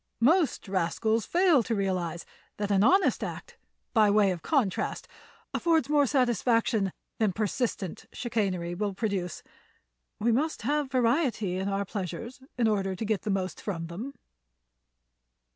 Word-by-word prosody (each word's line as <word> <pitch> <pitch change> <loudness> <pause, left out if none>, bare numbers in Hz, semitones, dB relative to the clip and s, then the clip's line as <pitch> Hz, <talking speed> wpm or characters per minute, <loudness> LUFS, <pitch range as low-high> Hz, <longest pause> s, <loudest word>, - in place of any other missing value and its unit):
Most 310 - +3
rascals 200 +4 0
fail 350 -6 +4
to 230 0 -2
realize 185 -4 -2 0.3
that 205 0 -2
an 195 0 +4
honest 380 - +4
act, - - -7 0.3
by 215 -3 +5
way 205 -1 +4
of 175 -2 -4
contrast, 240 - 0 0.5
affords 325 -4 +2
more 290 -2 +4
satisfaction 235 -5 +2 0.3
than 215 -3 +3
persistent 210 -2 -2
chicanery 195 -8 -2
will 200 +1 -2
produce. 195 -5 -2 0.8
We 235 +3 +2
must 300 +7 0
have 295 -1 0
variety 235 - +1
in 190 +1 -1
our 200 0 -1
pleasures 210 +6 -5 0.2
in 235 -2 +3
order 195 -3 0
to 220 - -4
get 215 -2 0
the 215 - -4
most 190 -2 -2
from 170 -5 -3
them." 215 +12 -7
215 Hz, 140 wpm, -28 LUFS, 190-250 Hz, 0.8 s, by